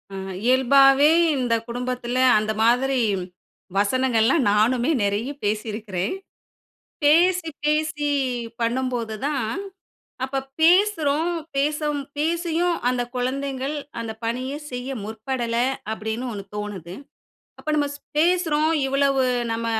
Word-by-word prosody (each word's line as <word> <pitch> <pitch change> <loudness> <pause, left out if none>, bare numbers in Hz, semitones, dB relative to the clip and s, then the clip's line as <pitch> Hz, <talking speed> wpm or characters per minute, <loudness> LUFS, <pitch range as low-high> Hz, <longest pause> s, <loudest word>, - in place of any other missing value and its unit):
ம் 190 0 -6
இயல்பாவே 270 +3 +5 0.3
இந்த 245 -3 0
குடும்பத்தில, 245 0 -3 0.2
அந்த 215 0 -1
மாதிரி 255 +3 +3 0.8
வசனங்கள்லாம் 250 +5 +2
நானுமே 240 +7 +2
நெறைய 205 +5 -1 0.2
பேசியிருக்கிறேன். 210 - -2 0.9
பேசி 340 +3 +4
பேசி 300 0 0 0.5
பண்ணம்போது 235 -1 -1
தான். 270 -7 -1 0.8
அப்போ 270 +1 -2 0.2
பேசுறோம் 335 -3 +3 0.2
பேசம் 295 +1 0 0.2
பேசியும், 335 +2 0
அந்த 250 -1 0
குழந்தைங்கள், 270 +2 -2 0.3
அந்த 225 -1 -5
பணிய 255 +4 -2 0.2
செய்ய 250 +1 -5
முற்படல, 230 +2 -3 0.4
அப்படின்னு 220 +3 -4
ஒண்ணு 200 -1 -6
தோணுது. 190 -4 -6 0.7
அப்போ 310 - -4
நம்ம 290 -1 +1
ஸ் 285 - -12 0.2
பேசுறோம், 320 -3 +2 0.2
இவ்வளவு 275 0 +2 0.3
நம்ம 230 0 -2
260 Hz, 100 wpm, -23 LUFS, 230-295 Hz, 0.9 s, இயல்பாவே